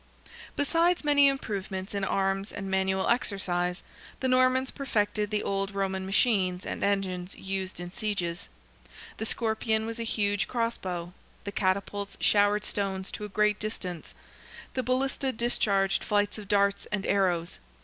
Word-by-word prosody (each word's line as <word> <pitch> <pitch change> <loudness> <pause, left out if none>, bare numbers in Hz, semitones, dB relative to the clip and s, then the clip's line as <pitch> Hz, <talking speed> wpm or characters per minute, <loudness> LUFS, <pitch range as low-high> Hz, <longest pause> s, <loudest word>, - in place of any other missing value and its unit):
Besides 335 +5 +2
many 290 -1 +6
improvements 200 -8 -2
in 200 -1 -2
arms 195 +1 0
and 195 -1 -5
manual 190 0 +1
exercise, 180 -6 0 0.4
the 260 - 0
Normans 255 0 +3
perfected 210 -6 0
the 210 -1 0
old 195 0 -1
Roman 190 -1 -1
machines 190 -3 +2
and - - -4
engines 190 -2 -1
used 190 -1 -4
in 175 0 -6
sieges. 200 -5 -2 0.7
The 220 - -3
scorpion 220 -1 0
was 230 +1 -4
a - - -1
huge 205 -2 0
cross 230 -1 0
bow, 175 -1 -5 0.3
the 200 - -4
catapults 200 +1 -1
showered 205 0 +3
stones 195 -2 -1
to 210 - -5
a - - -7
great 210 +1 +2
distance; 185 -6 -4 0.6
the 260 - 0
ballista 265 +1 0
discharged 205 -5 +1
flights 205 0 +1
of 205 - -9
darts 200 -1 +2
and 210 -2 -2
arrows. 180 - +1
200 Hz, 145 wpm, -28 LUFS, 190-220 Hz, 0.7 s, many